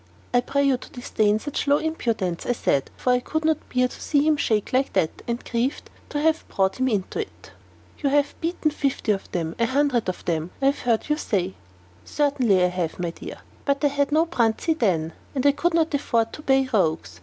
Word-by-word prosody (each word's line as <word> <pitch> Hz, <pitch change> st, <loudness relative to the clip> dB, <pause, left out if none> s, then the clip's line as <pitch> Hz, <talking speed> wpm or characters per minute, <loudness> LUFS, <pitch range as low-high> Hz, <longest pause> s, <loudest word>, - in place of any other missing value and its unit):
"I 245 Hz, -, +5 dB
pray 280 Hz, +3 st, 0 dB
you 275 Hz, -2 st, +3 dB
to -, -, -12 dB
disdain 215 Hz, -4 st, +1 dB
such 290 Hz, +5 st, -4 dB
low 285 Hz, +1 st, +5 dB
impudence," 230 Hz, -, -2 dB
I 245 Hz, -, +2 dB
said, 140 Hz, -, 0 dB
for 250 Hz, -, +2 dB
I 250 Hz, -, +3 dB
could 315 Hz, +5 st, -3 dB
not 315 Hz, -2 st, 0 dB
bear 250 Hz, 0 st, +3 dB
to -, -, -12 dB
see 290 Hz, -1 st, +2 dB
him 310 Hz, -, +4 dB
shake 220 Hz, -4 st, 0 dB
like 265 Hz, +1 st, +1 dB
that, 170 Hz, -5 st, 0 dB
and 235 Hz, +1 st, -3 dB
grieved 245 Hz, +3 st, -2 dB, 0.2 s
to 290 Hz, -, -2 dB
have 320 Hz, +1 st, +2 dB
brought 190 Hz, -1 st, 0 dB
him 260 Hz, -, +2 dB
into 210 Hz, -, -1 dB
it. 430 Hz, -, -7 dB, 0.5 s
"You 285 Hz, -, +1 dB
have 290 Hz, +1 st, +2 dB
beaten 330 Hz, -2 st, 0 dB
fifty 275 Hz, -6 st, 0 dB
of 195 Hz, -2 st, -3 dB
them 165 Hz, -2 st, -2 dB
a 230 Hz, -, +3 dB
hundred 260 Hz, -5 st, +1 dB
of 185 Hz, -, -6 dB
them 165 Hz, -1 st, -1 dB
I 270 Hz, -, -1 dB
have 280 Hz, -, -10 dB
heard 230 Hz, -3 st, 0 dB
you 300 Hz, 0 st, +1 dB
say." 190 Hz, -, -1 dB, 0.5 s
"Certainly 255 Hz, -10 st, +2 dB
I 180 Hz, -, +3 dB
have, 180 Hz, -3 st, -3 dB
my 175 Hz, -2 st, -2 dB
dear; -, -, -9 dB, 0.2 s
but 280 Hz, 0 st, 0 dB
I -, -, +5 dB
had 285 Hz, +1 st, 0 dB
no 315 Hz, +2 st, +4 dB
Bruntsea 245 Hz, -1 st, +1 dB
then, 170 Hz, -, 0 dB, 0.2 s
and 280 Hz, +1 st, +3 dB
could 345 Hz, +2 st, +1 dB
not 325 Hz, -2 st, +2 dB
afford 230 Hz, -5 st, +1 dB
to -, -, -8 dB
pay 270 Hz, -2 st, +3 dB
the 260 Hz, -3 st, -3 dB
rogues. 160 Hz, -, 0 dB
250 Hz, 220 wpm, -24 LUFS, 200-290 Hz, 0.5 s, I